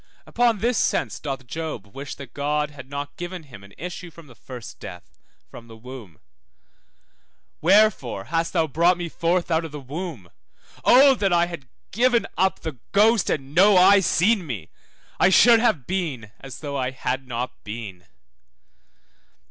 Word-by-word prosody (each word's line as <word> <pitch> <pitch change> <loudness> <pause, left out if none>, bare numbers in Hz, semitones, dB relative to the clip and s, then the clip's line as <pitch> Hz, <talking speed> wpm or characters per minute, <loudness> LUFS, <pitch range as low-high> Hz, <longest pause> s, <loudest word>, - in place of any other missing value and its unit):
Upon 240 -2 +1
this 235 +2 0
sense - - 0
doth 135 -3 -5
Job 155 -6 -5
wish 140 0 -7
that 135 -4 -11
God 150 +1 -1
had 135 -2 -12
not 145 0 -6
given 175 -1 -6
him 120 -9 -14
an 100 - -15
issue 180 +2 -7
from 165 0 -15
the 130 - -15
first 120 0 -11
death, - - -11 0.3
from 115 - -12
the 115 -1 -13
womb, 115 - -11 1.4
Wherefore 190 - +3
thou - - -19
hast 165 +2 -1 0.2
brought 175 +3 +3
me 175 -1 -4
forth 170 +2 -1
out 160 0 +2
of 165 - -7
the 150 - -7
womb? 140 - -7 0.5
Oh 270 +2 +7
that 200 -7 0
I 175 0 +4
had 170 -7 -9 0.2
given 240 +2 +2
up 190 0 +1
the 155 -7 -6
ghost, 215 +3 +4
and 135 -1 -3
no 190 +4 +6
eye 195 +2 +7
seen 195 +3 +2
me! 115 -8 -6 0.5
I 180 - +5
should 230 +4 +6
have 165 - +1
been 150 - -3
as 135 -3 -10
though 140 -2 -4
I 130 -1 -1
had 130 0 -4
not 125 +1 -5
been. 105 -5 -8
155 Hz, 165 wpm, -23 LUFS, 130-185 Hz, 1.4 s, Oh